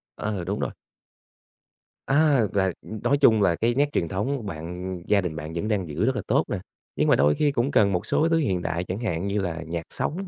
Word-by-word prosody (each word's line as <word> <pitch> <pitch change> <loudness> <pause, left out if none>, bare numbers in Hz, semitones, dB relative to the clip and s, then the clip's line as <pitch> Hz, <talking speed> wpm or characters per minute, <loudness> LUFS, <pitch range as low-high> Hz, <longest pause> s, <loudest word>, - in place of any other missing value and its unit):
Ờ, 100 -4 -3
đúng 100 +4 -3
rồi. - - -2 1.4
À, 140 -4 +4
là, 95 -2 +2
ừm, 110 -1 -8
nói 140 +4 +3
chung 115 -7 +5
là 85 -4 +3
cái 120 +4 0
nét 145 +2 +2
truyền 85 - 0
thống 110 - -2
bạn 90 +2 -5
gia 100 -1 +4
đình 85 -4 -4
bạn 80 0 -6
vẫn 85 +6 -2
đang 100 -6 0
giữ 80 +8 -1
rất 130 - +1
là - - -1
tốt 140 +7 +3
nè, 105 - -1 0.4
nhưng - - +1
mà - - +6
đôi 75 +2 +3
khi 150 -1 +2
cũng 135 +1 0
cần 100 -2 +4
một 90 - -1
số 160 - +2
thứ 165 - +3
hiện 95 - 0
đại 85 +2 -2
chẳng 95 +4 -4
hạn 95 -5 -2
như 100 +1 0
là 85 -3 -3
nhạc 85 0 -3
sống, 190 +5 -3
100 Hz, 240 wpm, -25 LUFS, 85-125 Hz, 1.4 s, mà